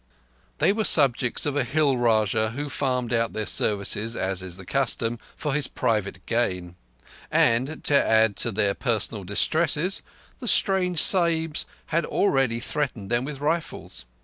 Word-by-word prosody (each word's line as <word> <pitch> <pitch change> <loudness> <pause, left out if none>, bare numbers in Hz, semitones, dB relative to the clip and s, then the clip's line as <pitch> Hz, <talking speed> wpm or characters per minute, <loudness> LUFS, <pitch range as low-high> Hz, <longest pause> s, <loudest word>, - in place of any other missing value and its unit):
They 195 - +3
were 220 +1 -1
subjects 130 - +3
of 145 -1 -2
a 145 - +1
Hill 140 +1 +1
Rajah 110 -2 +1
who 145 +1 -4
farmed 125 -3 -2
out 115 -1 0
their 110 - -3
services, 105 +3 -1
as 95 -1 -2
is 90 -1 -6
the 95 - -11
custom, 120 -1 -1 0.2
for 150 -3 -3
his 150 0 +1
private 100 -4 -2
gain; 90 -7 -2 0.5
and, 130 +7 +1
to 145 - +4
add 110 -2 +3
to 120 - +1
their 100 -1 0
personal 110 -4 -2
distresses, 155 - 0 0.4
the 250 - -6
strange 185 -6 +3
Sahibs 165 -3 +4 0.3
had 170 +1 +2
already 135 - 0
threatened 120 -6 -4
them 120 +2 +1
with 145 -1 -7
rifles. 155 - -3
125 Hz, 150 wpm, -24 LUFS, 110-150 Hz, 0.5 s, to